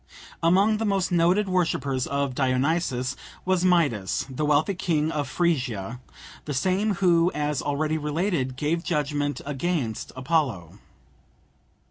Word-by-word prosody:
Among 195 +6 +4
the 225 - -2
most 195 -3 0
noted 175 +4 +3
worshippers 155 -8 0
of 140 -1 -1
Dionysus 130 0 0 0.3
was 185 -1 +1
Midas, 145 - +2
the 150 +3 -1
wealthy 150 +6 +3
king 160 -4 0
of 145 -4 -2
Phrygia, 125 - -1 0.5
the 145 - -3
same 195 +8 +1
who, 175 -2 +3
as 150 -2 -1
already 155 +2 -1
related, 150 -3 -1
gave 155 +5 -1
judgment 145 -3 -1
against 140 -5 -2
Apollo. 130 - -1
150 Hz, 120 wpm, -25 LUFS, 135-175 Hz, 0.5 s, Among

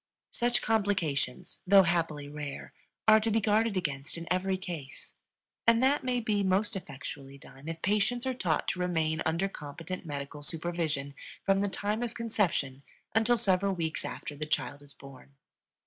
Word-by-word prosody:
Such 240 0 +1
complications, 190 - 0
though 195 0 +8
happily 165 -4 0
rare, 145 -1 -6 0.3
are 220 0 +9
to 220 +1 0
be 225 +1 +3
guarded 215 0 +2
against 145 -3 -2
in 170 0 -7
every 190 +1 0
case, 170 -8 -8 0.5
and 230 +2 +6
that 280 +3 +3
may 250 -1 +1
be 215 -3 +1
most 200 +3 +2
effectually 140 -4 -7
done 135 +2 -14
if 165 0 -5
patients 210 +5 +1
are 260 - +1
taught 175 -10 0
to - - -2
remain 160 -3 +1
under 165 +5 +1
competent 165 +1 -7
medical 145 -1 -5
supervision 155 -3 -2 0.3
from 195 0 +4
the 205 - +1
time 210 +3 -1
of 235 -1 -3
conception 185 - 0 0.3
until 225 +2 +4
several 195 -3 +2
weeks 160 -2 -2
after 145 - -5
the 155 +1 -4
child 145 -1 -1
is 145 -1 -15
born. 135 0 -14
180 Hz, 165 wpm, -30 LUFS, 150-210 Hz, 0.5 s, are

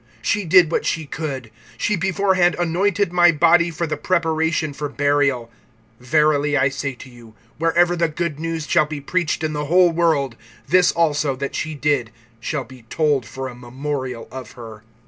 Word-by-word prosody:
(8)She 200 - -1
did 175 -2 +6
what - - 0
she 160 -1 -2
could; 135 -6 -5 0.3
she 210 - 0
beforehand 190 -2 +2
anointed 175 +2 0
my 175 -1 +6
body 170 +2 +4
for 170 +1 -3
the 150 -2 -3
preparation 160 -2 0
for 145 +1 -4
burial. 140 -5 0 0.5
(9)Verily 150 +1 +2
I 135 0 +3
say 135 0 -4
to 125 - -12
you, 120 -3 -16 0.2
wherever 170 +2 +3
the 170 -1 +1
good 155 -2 -3
news 165 -1 -3
shall 155 -3 +3
be 150 -1 -5
preached 165 +3 -1
in 155 -1 -1
the 150 0 -3
whole 175 +3 +4
world, 160 -7 +1 0.3
this 180 +3 +4
also 150 -4 +1
that 140 +1 -5
she 155 -1 -3
did 145 -5 0 0.3
shall 135 +4 -3
be 130 -1 -15
told 145 -7 0
for 135 0 -6
a 125 - -8
memorial 125 0 -5
of 130 -4 -9
her. 110 -3 -11
150 Hz, 175 wpm, -21 LUFS, 135-170 Hz, 0.5 s, did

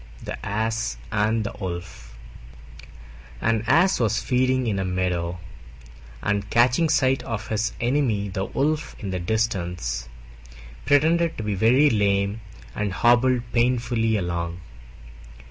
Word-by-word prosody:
THE - - -6
ASS 110 - -2
AND 110 +1 +1
THE 105 - -4
WOLF 85 -10 -7 1.2
An 115 - +1
Ass 180 +8 +4
was 110 -2 +1
feeding 130 0 +1
in 105 -4 -1
a - - 0
meadow, 90 -2 -1 0.9
and, 100 0 -1
catching 125 +9 +3
sight 135 -3 +2
of 110 -1 -5
his 110 +1 -1
enemy 120 -5 +1
the 95 0 -3
Wolf 150 +2 -1
in 100 -3 -5
the 90 - -2
distance, 90 - -2 0.8
pretended 165 +3 +3
to 110 - -4
be 105 -1 -1
very 125 +9 +4
lame 100 0 +1 0.3
and 105 -1 -2
hobbled 120 +5 +3
painfully 120 -2 +1
along. 85 -1 -3
110 Hz, 125 wpm, -24 LUFS, 95-125 Hz, 1.2 s, Ass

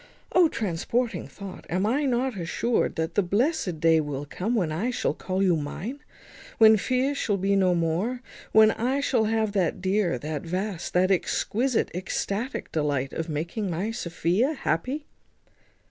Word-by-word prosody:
O! 360 -2 +6
transporting 225 - -2
thought! 195 -2 -10
am 185 +3 0
I 270 +7 +1
not 255 -1 0
assured 195 +6 0
that 160 0 -2
the - - +3
blessed 200 - 0
day 165 0 +4
will 145 -1 -4
come, 205 +11 -2
when 175 -8 +1
I 185 +11 -1
shall 250 - 0
call 190 +1 -2
you 180 -3 +4
mine; 175 - -5 0.6
when 220 -1 +8
fears 255 +6 0
shall 205 -2 0
be 195 +1 +1
no 185 -2 +3
more; 175 +10 -1 0.3
when 220 0 +7
I 255 +6 0
shall 250 -5 +2
have 220 -1 +1
that 190 -2 0
dear, 190 -4 +1
that 150 +3 -4
vast, 180 +2 -4
that 185 +2 +4
exquisite, 230 +6 0
ecstatic 200 +6 -3
delight 145 -4 -1
of 165 0 -3
making 170 +7 -3
my 185 +6 -2
Sophia 185 - 0
happy?" 265 - -2
195 Hz, 160 wpm, -26 LUFS, 170-235 Hz, 0.6 s, when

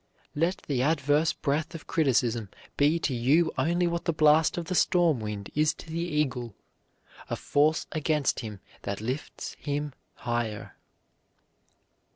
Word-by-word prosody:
"Let 165 +5 0
the 135 -4 0
adverse 145 +2 +2
breath 155 +4 -2
of 160 - -8
criticism 120 - +1 0.3
be 150 +3 +3
to 155 -4 -1
you 135 +8 +3
only 175 +2 +1
what 170 0 -1
the - - +2
blast 155 +1 +4
of 170 - -2
the 185 - -3
storm 170 -6 +3
wind 105 -2 -5
is 155 0 +2
to - - -12
the 165 - -2
eagle, 135 - -1 0.7
a - - -1
force 150 +2 +2
against 155 -2 0
him 105 -5 -7 0.2
that 100 -1 -4
lifts 125 +7 -5
him 145 -1 -3 0.2
higher." 120 -3 -3
145 Hz, 145 wpm, -28 LUFS, 120-160 Hz, 0.7 s, blast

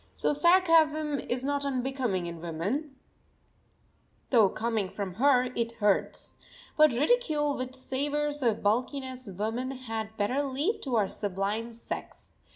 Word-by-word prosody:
So - - +1
sarcasm 310 -3 +4
is 245 +1 -3
not 285 +1 -1
unbecoming 255 -8 -1
in 170 -1 -7
woman, 200 - -3 1.4
though 225 -6 +6
coming 220 -3 -1
from 195 -1 -5
her 250 +4 +4
it 230 0 -1
hurts. 205 -3 -1 0.4
But 305 0 +7
ridicule 295 - +1
which 255 0 -5
savours 290 +3 -2
of 230 -4 +1
bulkiness 255 +3 -1
woman 220 +7 -3
had 225 -4 -5
better 230 +7 +1
leave 290 - -1
to 260 -4 -2
our 210 -3 +3
sublime 205 +4 -3
sex. 230 0 -8
255 Hz, 130 wpm, -29 LUFS, 215-285 Hz, 1.4 s, But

